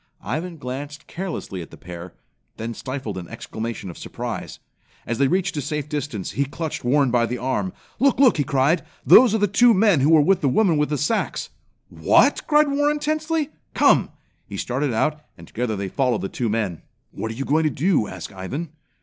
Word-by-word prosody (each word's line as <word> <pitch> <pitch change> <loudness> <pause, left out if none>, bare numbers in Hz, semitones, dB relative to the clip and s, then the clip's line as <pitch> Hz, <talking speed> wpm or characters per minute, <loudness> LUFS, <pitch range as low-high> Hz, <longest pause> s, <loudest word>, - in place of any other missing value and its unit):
Ivan 160 - -4
glanced 145 +4 -6
carelessly 170 - -5
at 80 - -9
the - - -13
pair, 85 0 -9 0.4
then 115 +1 -4
stifled 130 -6 -5
an 85 - -9
exclamation 115 -2 -6
of - - -13
surprise. - - -6 0.5
As 120 +1 -3
they 140 - +4
reached 180 +3 0
a - - 0
safe 150 +1 -3
distance, 145 - -4
he 140 - 0
clutched 155 +3 -5
Warren 135 +1 +3
by 120 -1 +2
the 125 - -3
arm. 130 +9 -1 0.3
"Look, 270 -1 +3
look!" 260 -9 +6
he 145 - +2
cried. 140 +4 +2 0.2
"Those 240 -3 +7
are - - +3
the 205 - +3
two 230 +4 +5
men 195 -5 +4
who 140 +3 +3
were 160 -1 +7
with 190 +5 +3
the 140 - +2
woman 175 +2 +3
with 150 0 +1
the 150 - 0
sacks." 150 - -1 0.4
"What!" - - +3
cried 300 -1 +4
Warren 290 +1 +2
tensely. 310 0 -1 0.2
"Come!" - - +4 0.4
He - - -7
started 130 +3 -1
out, 150 +7 0 0.2
and - - -13
together 115 -1 -2
they 100 -1 -3
followed 125 +3 0
the 95 - -3
two 120 -3 -2
men. 105 -6 -2 0.3
"What 110 - -5
are 110 - -5
you 135 +3 -4
going 155 +3 +2
to - - +3
do?" 150 - +1
asked - - -8
Ivan. 135 - -5
145 Hz, 200 wpm, -23 LUFS, 120-185 Hz, 0.5 s, Those